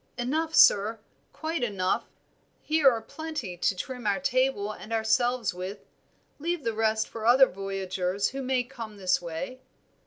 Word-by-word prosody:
"Enough, 315 +6 -1
sir, 210 +3 +6 0.3
quite 320 0 -3
enough. 195 -5 0 0.6
Here 310 -3 +5
are 230 -3 -2
plenty 300 - -6
to 180 +2 +1
trim 245 +4 -5
our 200 - +2
table 255 -6 +1
and 215 +1 -10
ourselves 225 0 +1
with; 185 +3 -7 0.5
leave 335 0 -2
the 230 - -1
rest 220 0 +1
for 225 -1 -5
other 260 +3 +8
voyagers 195 -1 -2
who 270 +1 -5
may 255 -1 +1
come 230 -5 -9
this 185 -2 +1
way." 175 +9 -6
225 Hz, 150 wpm, -27 LUFS, 195-265 Hz, 0.6 s, other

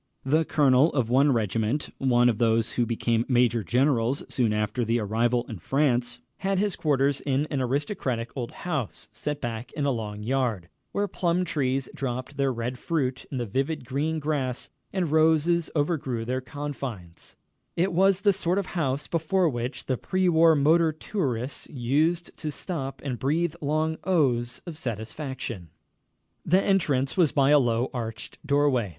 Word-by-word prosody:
The 155 +4 +3
colonel 140 +1 +4
of 120 -5 0
one 140 +3 +5
regiment 115 +4 0
one 120 -2 +4
of 115 -3 +1
those 115 -1 +2
who 120 -1 0
became 115 0 +1
major 120 -3 +3
generals 125 - +1
soon 120 -4 +1
after 105 +3 0
the 115 +1 +1
arrival 115 +3 +1
in 110 -6 -7
France 125 - +1 0.2
had 195 0 -1
his 200 -1 +1
quarters 140 -2 +1
in 140 +1 0
an 140 -3 0
aristocratic 130 - -2
old 125 -4 -3 0.2
house, 150 - -3
set 150 -1 -3
back 120 -2 -5
in 145 - -2
a 140 - +2
long 105 -3 -4
yard, 115 -8 -1 0.2
where 205 0 0
plum 180 -1 0
trees 135 -5 -1
dropped 130 +1 -4
their 135 -1 +2
red 125 +1 -4
fruit 130 -6 -1
in 135 - -4
the 120 - -1
vivid 135 +7 -2
green 150 +6 -1
grass 140 -5 -2 0.2
and 180 -5 -1
roses 160 +1 +3
overgrew 145 -7 -1
their 130 +2 -1
confines 130 - -7 0.4
it 180 +2 +1
was 190 +2 +3
the 200 -1 +4
sort 180 -1 0
of 200 - 0
house 145 -6 -1
before 170 +2 +1
which 120 0 -4
the 130 - -1
pre 185 -1 0
war 165 -1 +5
motor 160 +3 +4
tourists 140 - -3
used 155 +6 0
to 155 - -4
stop 140 -3 -5
and 125 -4 -3
breathe 160 +4 +1
long 155 +2 0
"ohs" 125 -10 +1
of 165 -3 -7
satisfaction. 115 - -5 0.7
The 185 +3 +4
entrance 145 -9 +1
was 170 -6 +3
by 140 0 +3
a 150 - +7
low, 120 -1 +1
arched 115 -3 -6
doorway. 140 -6 +2
135 Hz, 165 wpm, -26 LUFS, 120-155 Hz, 0.7 s, a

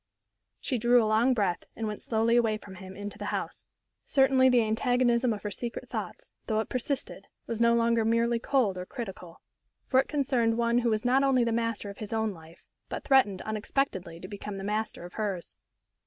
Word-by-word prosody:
She 245 - -2
drew 240 +1 +5
a - - +1
long 225 +4 +3
breath, 195 -6 0
and 225 - -3
went 210 -1 -4
slowly 230 +1 +1
away 225 -3 +3
from 205 -2 -12
him 190 0 -10
into 205 0 -7
the - - -4
house. - - -4 0.4
Certainly 265 -2 +4
the 245 -2 +4
antagonism 240 +2 +2
of 210 -2 -4
her 210 - -3
secret 235 +3 -5
thoughts, - - -5 0.2
though 220 -1 +1
it 220 - -3
persisted, 260 +2 -3 0.2
was 230 -1 -3
no 235 0 +5
longer 230 -1 +2
merely 230 +1 +2
cold 230 -8 +1
or 180 - -5
critical. 185 -7 -8 0.4
For 260 - +3
it 270 - +1
concerned 255 -6 +1
one 235 0 +2
who 240 -1 +1
was 215 +1 0
not 260 +2 +4
only 265 -3 +3
the 230 - 0
master 230 -3 -2
of 200 - -14
his 215 0 -5
own 220 -1 0
life, 165 0 -15 0.3
but - - -5
threatened 235 -9 +3
unexpectedly 210 -5 -2
to 185 - -8
become 205 0 -6
the 195 - -6
master 210 -2 -2
of 175 - -11
hers. 200 -5 -3
225 Hz, 200 wpm, -28 LUFS, 205-245 Hz, 0.4 s, drew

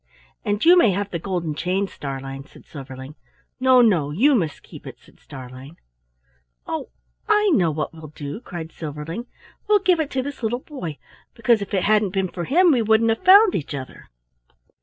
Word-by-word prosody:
"And 205 +2 -1
you 350 +2 +8
may 235 - +4
have 200 +1 -3
the 170 - -3
golden 170 -3 -3
chain, 185 +6 -1
Starlein," 135 -3 -7
said - - -18
Silverling. 135 -1 -10 0.5
"No, 255 -1 +5
no! 180 -11 +3
you 240 - +3
must 165 - -1
keep - - -13
it," - - -9
said - - -23
Starlein. 130 +3 -11 0.9
"Oh, - - -5 0.4
I 420 -1 +4
know 175 - +3
what 155 +1 -3
we'll 160 -1 -11
do!" 145 +4 -7
cried 170 -7 -8
Silverling; 160 - -7 0.4
"we'll 420 0 +5
give 370 -4 +2
it 310 -3 -1
to 260 -1 -2
this 285 0 -7
little 230 +1 -1
boy, 180 - -7 0.4
because 230 -1 +2
if 200 - -6
it 185 - +1
hadn't 210 -2 +2
been 190 -2 0
for 175 -1 -5
him 350 +5 +4
we 250 -5 +2
wouldn't 220 +1 +3
have 225 - -3
found 395 +2 +7
each 145 -2 -3
other." 130 -2 -9
190 Hz, 185 wpm, -22 LUFS, 150-250 Hz, 0.9 s, you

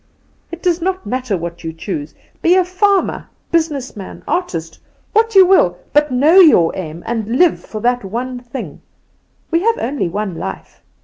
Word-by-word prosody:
It 340 0 -8
does 350 -2 +1
not 375 +1 -2
matter 250 -5 -2
what 170 0 -7
you 165 - -4
choose 160 -3 -6 0.3
be 345 +2 +4
a 370 -1 +3
farmer, 380 +2 0 0.2
businessman, 280 - -2
artist, 165 - -3 0.3
what 450 0 +2
you 380 -1 +9
will 185 - +4 0.2
but 295 -1 +3
know 295 +9 +5
your 295 - +6
aim, 165 -2 -6
and 230 +1 -2
live 355 0 +4
for 215 - -7
that 245 0 +1
one 245 +6 -4
thing. 245 +2 -8 0.7
We 335 +1 +2
have 460 +3 +2
only 255 -6 -2
one 200 +1 -3
life. 95 - -7
255 Hz, 165 wpm, -17 LUFS, -, 0.7 s, you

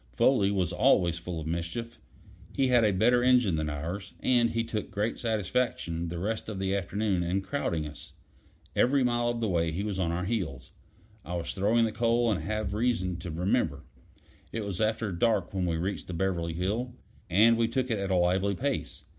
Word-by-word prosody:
Foley 100 - +3
was 95 -3 0
always 85 -1 +3
full 85 -1 -5
of 80 - -6
mischief. 85 +9 -4 0.6
He 135 -1 +2
had 120 -2 +5
a 105 - +4
better 120 +6 +3
engine 125 -8 +4
than 80 -1 -1
ours, 85 +7 -5
and 120 -2 +3
he 115 0 0
took 110 -2 -4
great 105 +3 -2
satisfaction 105 -6 -1
the 85 +1 -5
rest 110 +5 -3
of 105 - -5
the 95 0 0
afternoon 100 0 0
in 90 +3 0
crowding 95 - -2
us. 75 0 -10 0.6
Every 135 +1 +3
mile 120 -1 +1
of 120 -1 -2
the 115 - 0
way 85 -3 +1
he 90 +5 -3
was 100 -3 -3
on 85 -3 0
our 90 +2 -2
heels. 85 - -3 0.5
I 90 - -5
was 85 - -3
throwing 110 +4 +3
the 110 - -1
coal, 115 +1 +2
and 100 - -1
have 110 -1 -2
reason 105 -6 0
to 85 0 -7
remember. 85 - 0 0.7
It 115 - -3
was 100 0 -3
after 110 -1 0
dark 100 +1 +1
when 95 -2 0
we 85 -1 0
reached 95 +5 -3
the 90 - -5
Beverly 85 -2 -1
Hill, 110 +9 -2 0.3
and 110 +7 +5
we 115 0 +2
took 130 +2 -1
it 110 - 0
at 100 0 -2
a 95 - +2
lively 95 +3 +2
pace. 140 +5 -3
100 Hz, 200 wpm, -29 LUFS, 85-115 Hz, 0.7 s, had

